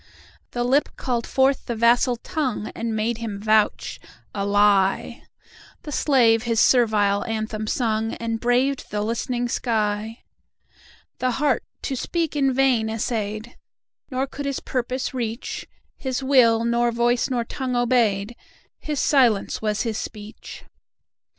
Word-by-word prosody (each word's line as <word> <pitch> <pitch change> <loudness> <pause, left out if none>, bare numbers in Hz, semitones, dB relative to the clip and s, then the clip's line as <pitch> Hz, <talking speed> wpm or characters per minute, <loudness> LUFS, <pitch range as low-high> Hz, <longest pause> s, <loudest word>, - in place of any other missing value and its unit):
The 240 - -2
Lip 270 +4 +2
called 240 -3 -2
forth 270 0 +2
the 235 - -2
vassal 240 +2 +3
Tongue, 260 - -3
And 230 -1 -3
made 220 +2 -1
him 215 -4 -5
vouch—a 215 -1 -1
lie! 200 -1 +2 0.6
The 300 - -7
slave 240 -6 +3
his 230 -2 0
servile 210 -5 +3
anthem 220 -1 -3
sung, 225 -1 0
And 230 -1 -3
braved 250 +3 +1
the 210 0 -2
listening 240 +2 -2
sky. 220 -1 -2 1.0
The 255 -1 0
Heart 270 -1 +1 0.2
to 270 - -2
speak 330 +4 -2
in 275 -2 +2
vain 255 -4 +2
essayed, 220 0 -3 0.5
Nor 260 0 -1
could 280 +1 -6
his 275 - -2
purpose 255 +1 -3
reach—His 250 +2 -5
will 235 -4 +4
nor 235 0 +2
voice 240 +2 +1
nor 245 -2 0
tongue 255 +1 -3
obeyed, 235 -3 +1 0.4
His 300 -2 -3
silence 240 -8 +2
was 210 -1 0
his 225 -3 -2
speech. 215 0 -9
235 Hz, 130 wpm, -23 LUFS, 220-255 Hz, 1.0 s, will